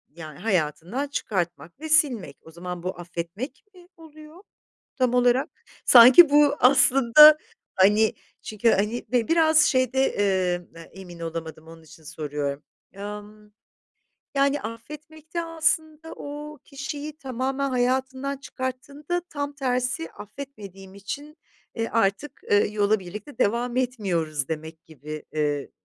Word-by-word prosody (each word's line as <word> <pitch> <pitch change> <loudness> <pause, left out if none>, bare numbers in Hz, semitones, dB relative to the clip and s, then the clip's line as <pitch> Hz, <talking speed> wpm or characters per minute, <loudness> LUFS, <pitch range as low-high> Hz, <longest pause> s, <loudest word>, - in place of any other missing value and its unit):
yani, 155 -3 -10
hayatından 180 - -1
çıkartmak 175 - -4
ve 315 +1 -7
silmek. 250 - +2
O 160 - -15
zaman 175 +1 -7
bu 180 -1 -5
affetmek 175 - -7
mi 355 -1 -18
oluyor, 315 +2 -15 0.5
tam 255 -2 +1
olarak? 245 +1 +2 0.4
Sanki 255 +7 +9
bu 290 0 +4
aslında 275 +3 +7 0.4
hani 210 +3 +4 0.3
çünkü 215 +2 0
hani, 210 +5 -1
be 245 -2 +1
biraz 320 -1 +4
şeyde, 255 -2 +2 0.2
eee, 185 -3 0 0.2
emin 180 -3 -12
olamadım, 160 -1 -7
onun 165 0 -14
için 160 0 -17
soruyorum. 145 -2 -5 0.3
Emm, 210 +1 -9 0.8
yani, 280 +1 +2
affetmek 300 +7 -10
de 340 - 0
aslında 320 -1 -2
o 295 +1 -8
kişiyi 290 +2 -7
tamamen 270 0 -3
hayatından 260 +2 -1
çıkarttığında 280 +5 -5
tam 285 -1 -4
tersi 250 - -2
affetmediğim 200 -5 -11
için, 285 +10 -8 0.4
eee, 230 -1 -2
artık, 230 +6 -1
ııı, 205 0 +4
yola 210 0 +1
birlikte 210 +8 -10
devam 240 +4 0
etmiyoruz 175 - -1
demek 160 +1 -7
gibi, 155 0 -9
eee, 145 -2 -2
235 Hz, 120 wpm, -24 LUFS, 180-285 Hz, 0.8 s, Sanki